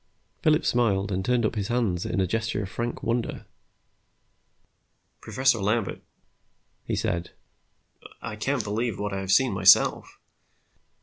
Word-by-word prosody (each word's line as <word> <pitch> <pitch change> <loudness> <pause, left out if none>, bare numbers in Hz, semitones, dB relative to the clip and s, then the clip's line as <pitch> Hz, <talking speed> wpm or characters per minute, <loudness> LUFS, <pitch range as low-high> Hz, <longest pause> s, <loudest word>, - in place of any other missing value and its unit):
Phillips 155 0 +2
smiled 105 -5 +1
and 95 0 -1
turned 125 0 +1
up 110 - 0
his 105 -3 -3
hands 110 -8 -1
in - - -2
a 95 - +2
gesture 110 +2 -2
of 95 - -6
frank 120 +3 -4
wonder. 115 0 -2 1.8
"Professor 130 -3 +1
Lambert," 105 +1 -1 0.8
he - - -2
said, 85 0 -2 0.9
"I 105 - -6
can't 130 +3 -1
believe 110 +2 -2
what 105 0 -3
I 95 - -2
have 95 0 -3
seen 130 +6 +4
myself. 95 0 +4
105 Hz, 135 wpm, -26 LUFS, 95-120 Hz, 1.8 s, seen